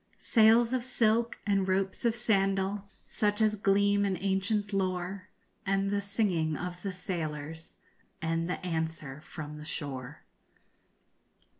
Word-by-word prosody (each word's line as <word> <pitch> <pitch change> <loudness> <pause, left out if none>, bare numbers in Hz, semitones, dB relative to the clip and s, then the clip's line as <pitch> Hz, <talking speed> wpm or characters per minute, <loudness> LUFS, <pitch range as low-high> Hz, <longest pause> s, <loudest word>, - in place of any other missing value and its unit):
Sails 230 +1 +5
of 255 -2 0
silk 235 -2 +1
and 195 -2 +2
ropes 190 +3 0
of 230 -1 +3
sandal 195 -2 +1 0.2
Such 210 0 0
as 215 -1 +4
gleam 200 0 +3
in 195 -2 0
ancient 200 +2 0
lore, 185 0 -1 0.4
And 195 0 +1
the 205 0 +1
singing 190 -6 0
of 180 0 -5
the 195 - -3
sailors, 160 -3 -5 0.4
_And 165 0 -1
the 180 - -2
answer 160 -4 -3
from 150 -1 -7
the 150 0 -8
shore. 140 -3 -4
195 Hz, 130 wpm, -30 LUFS, 165-205 Hz, 0.4 s, Sails